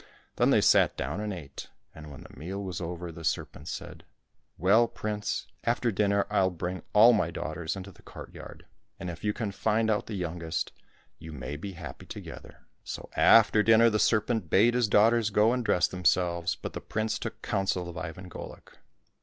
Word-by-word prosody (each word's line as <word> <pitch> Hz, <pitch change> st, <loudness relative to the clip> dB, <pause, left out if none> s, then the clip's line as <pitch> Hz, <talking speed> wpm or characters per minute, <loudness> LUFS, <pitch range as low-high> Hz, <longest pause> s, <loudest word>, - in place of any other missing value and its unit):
Then -, -, +3 dB
they -, -, +4 dB
sat -, -, +4 dB
down 75 Hz, +8 st, -3 dB
and 105 Hz, 0 st, -3 dB
ate, 80 Hz, -8 st, -8 dB, 0.2 s
and 75 Hz, -1 st, -11 dB
when 70 Hz, -3 st, -11 dB
the -, -, -15 dB
meal 95 Hz, +5 st, -5 dB
was 90 Hz, -4 st, -5 dB
over 85 Hz, 0 st, -5 dB
the 85 Hz, 0 st, -10 dB
serpent 75 Hz, -1 st, -3 dB
said, -, -, -7 dB, 0.3 s
" -, -, -46 dB
Well, 105 Hz, +7 st, +4 dB
prince, 105 Hz, -2 st, -3 dB, 0.2 s
after 120 Hz, 0 st, +1 dB
dinner 100 Hz, 0 st, +1 dB
I'll 95 Hz, -1 st, +3 dB
bring 90 Hz, 0 st, -5 dB
all 115 Hz, +4 st, +7 dB
my 90 Hz, -7 st, +1 dB
daughters 80 Hz, 0 st, -4 dB
into 95 Hz, +1 st, -8 dB
the -, -, -20 dB
courtyard, -, -, -11 dB, 0.3 s
and 90 Hz, -, -4 dB
if 85 Hz, -, -11 dB
you 105 Hz, -, +1 dB
can 105 Hz, -2 st, -3 dB
find 110 Hz, +2 st, +1 dB
out 105 Hz, -, -1 dB
the 110 Hz, -, -5 dB
youngest, 85 Hz, -3 st, -3 dB, 0.5 s
you 80 Hz, 0 st, -9 dB
may 70 Hz, 0 st, -6 dB
be 95 Hz, +6 st, -7 dB
happy 85 Hz, 0 st, -9 dB
together." -, -, -10 dB, 0.2 s
So -, -, -7 dB
after 110 Hz, -1 st, +6 dB
dinner 115 Hz, +1 st, +5 dB
the 110 Hz, -, +1 dB
serpent 110 Hz, -5 st, +1 dB
bade 110 Hz, +8 st, +4 dB
his 120 Hz, -2 st, +2 dB
daughters 110 Hz, +2 st, +4 dB
go 105 Hz, +3 st, +3 dB
and 125 Hz, -1 st, -1 dB
dress 90 Hz, -5 st, +2 dB
themselves, 85 Hz, -1 st, +1 dB
but -, -, -7 dB
the -, -, -6 dB
prince 110 Hz, 0 st, -2 dB
took -, -, -6 dB
counsel 95 Hz, -2 st, -1 dB
of 85 Hz, -, -8 dB
Ivan 80 Hz, +3 st, -7 dB
Golik. 90 Hz, -, -11 dB
95 Hz, 190 wpm, -28 LUFS, 85-110 Hz, 0.5 s, all